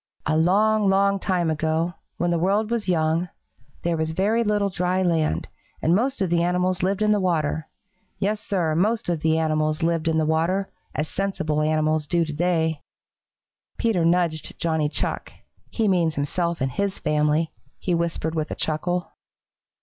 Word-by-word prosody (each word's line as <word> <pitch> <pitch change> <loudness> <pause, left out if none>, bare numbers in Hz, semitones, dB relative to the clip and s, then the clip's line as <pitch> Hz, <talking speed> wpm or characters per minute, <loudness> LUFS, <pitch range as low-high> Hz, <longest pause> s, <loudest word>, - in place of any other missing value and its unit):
"A 155 - +1
long, 205 +5 +3
long 200 +1 +3
time 180 -4 0
ago, 160 +2 0 0.2
when 175 0 0
the 170 - +1
world 205 +5 +1
was 235 -3 -1
young, 165 0 +1 0.5
there 170 0 +1
was 160 0 -2
very 210 +7 +2
little 205 -2 +1
dry 180 +1 0
land, 165 -3 +1 0.3
and 165 - +2
most 245 +1 0
of 180 - -2
the 170 -1 +3
animals 180 +1 +1
lived 195 +3 +1
in 210 - +3
the 210 - +3
water. 160 -4 0 0.5
Yes, 210 +2 0
Sir, 175 -6 0
most 210 +6 +1
of 170 -2 0
the 160 +1 +2
animals 155 0 0
lived 165 -1 +1
in 160 -1 +2
the 155 - +2
water, 165 +5 0 0.2
as 150 - -1
sensible 160 -5 -1
animals 155 0 +1
do 170 0 +2
to 155 - -5
day." 160 -1 0 1.0
Peter 220 -7 +1
nudged 170 -2 +1
Johnny 160 -3 0
Chuck. - - -3 0.4
"He 225 -2 0
means 170 -5 +2
himself 170 +4 -1
and 130 0 0
his 200 +7 -2
family," 150 +1 +1 0.3
he 180 - -2
whispered 165 -1 -1
with 155 -1 -2
a - - -4
chuckle. 175 +3 -2
170 Hz, 170 wpm, -24 LUFS, 160-190 Hz, 1.0 s, long